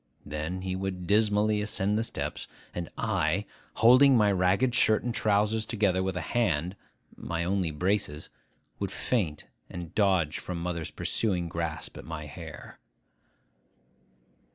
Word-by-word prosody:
Then 80 +5 -4
he 95 -1 -2
would 95 -1 -4
dismally 105 +1 +3
ascend 105 -1 0
the 110 - +2
steps; - - -4 0.3
and 85 -2 -4
I, - - 0 0.3
holding 130 +3 +7
my 105 -2 +4
ragged 95 +7 +2
shirt 110 -4 +3
and 120 -1 -2
trousers 105 +1 +2
together 105 -5 +1
with 95 -1 -2
a - - -1
hand 90 -4 0 0.4
(my 85 0 -3
only 95 -1 0
braces), 80 -1 -1 0.5
would - - -2
feint 90 - -1 0.2
and 85 -2 -7
dodge 95 -7 +2
from 90 -2 -5
mother's 85 -2 -3
pursuing 90 -6 -1
grasp 80 -2 -4
at - - -9
my 80 -1 -6
hair. 75 - -10
95 Hz, 135 wpm, -28 LUFS, 85-105 Hz, 0.5 s, holding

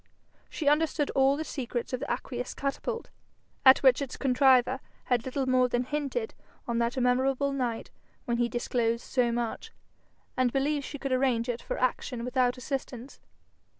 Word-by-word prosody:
She 305 - -4
understood 300 0 +2
all 270 +1 +3
the 315 - -2
secrets 245 -5 -4
of 255 - -1
the 285 - -5
aqueous 250 -1 -4
catapult, 370 - -3 0.5
at 265 0 +7
which 260 0 +5
its 275 -2 -5
contriver 260 -1 +4 0.2
had 245 -2 0
little 265 +1 -2
more 255 -1 +3
than 245 0 0
hinted 295 - -3 0.3
on 235 -1 0
that 235 +2 0
memorable 260 +3 +2
night 245 -4 -3 0.3
when 235 -1 0
he 240 0 +1
disclosed 235 -1 -1
so 245 -2 +1
much, 235 -1 -3 0.6
and 255 -1 +2
believed 280 +2 0
she 290 - -6
could 275 -1 -4
arrange 255 -2 +1
it 235 -1 -2
for - - -4
action 250 -1 -1
without 250 0 +1
assistance. 255 -1 -5
255 Hz, 160 wpm, -28 LUFS, 245-275 Hz, 0.6 s, at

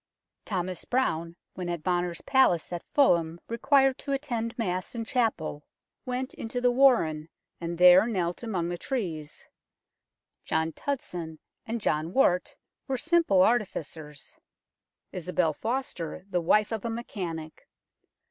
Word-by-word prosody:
Thomas 185 -3 -3
Browne, 170 -10 -1 0.2
when 180 -1 -5
at 170 -3 -3
Bonner's 175 -1 -1
palace 220 - +3
at 175 - -3
Fulham 170 - +3
required 270 +2 +3
to 280 - -3
attend 240 -5 -3
Mass 185 -2 -2
in 230 -1 -3
chapel, 215 - -1 0.4
went 255 +1 -3
into 230 +2 -4
the 245 0 +3
warren 225 - +3 0.3
and 170 0 -4
there 180 +4 +8
knelt 180 -6 -1
among 190 -8 -2
the 175 0 -4
trees. 165 - -4 1.0
John 160 0 0
Tudson 175 - -4 0.3
and 230 +1 -2
John 160 -3 -1
Wart 180 -9 +2 0.3
were 265 -2 -1
simple 320 - +3
artificers; 160 -10 -2 0.8
Isobel 180 -2 0
Foster, 205 - -4
the 180 - +1
wife 210 +6 +3
of 220 -3 -3
a 235 - -2
mechanic. 175 -9 -6
185 Hz, 130 wpm, -28 LUFS, 170-245 Hz, 1.0 s, there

